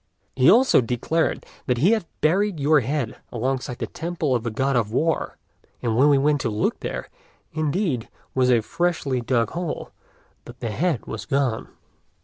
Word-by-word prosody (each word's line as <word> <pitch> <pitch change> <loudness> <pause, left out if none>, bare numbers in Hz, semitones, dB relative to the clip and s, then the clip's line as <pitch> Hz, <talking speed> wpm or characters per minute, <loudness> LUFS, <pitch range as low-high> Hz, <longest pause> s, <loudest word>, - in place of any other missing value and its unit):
He 130 +1 +5
also 250 - +6
declared 125 +7 -1 0.2
that 125 -2 +1
he 165 - +4
had 220 -7 +1
buried 185 +3 +2
your 150 +2 +4
head 135 -1 -2
alongside 125 +1 -2
the - - -3
temple 165 -4 -2
of 120 - +1
the 120 - -3
God 135 +4 0
of 110 -3 +1
War; 160 +7 0 0.5
and 115 -2 0
when 135 +5 +5
we 145 - +5
went 145 +1 +2
to 125 - -1
look, 105 0 -1
there, - - -4 0.5
indeed, 155 - -1 0.2
was 130 -1 +2
a 120 -2 +4
freshly 145 -2 -1
dug 115 -2 +1
hole, 170 -2 -4 0.5
but 120 +1 -12
the 115 -3 -3
head 155 - 0
was 105 -3 -6
gone." 135 -3 0
135 Hz, 170 wpm, -23 LUFS, 120-160 Hz, 0.5 s, also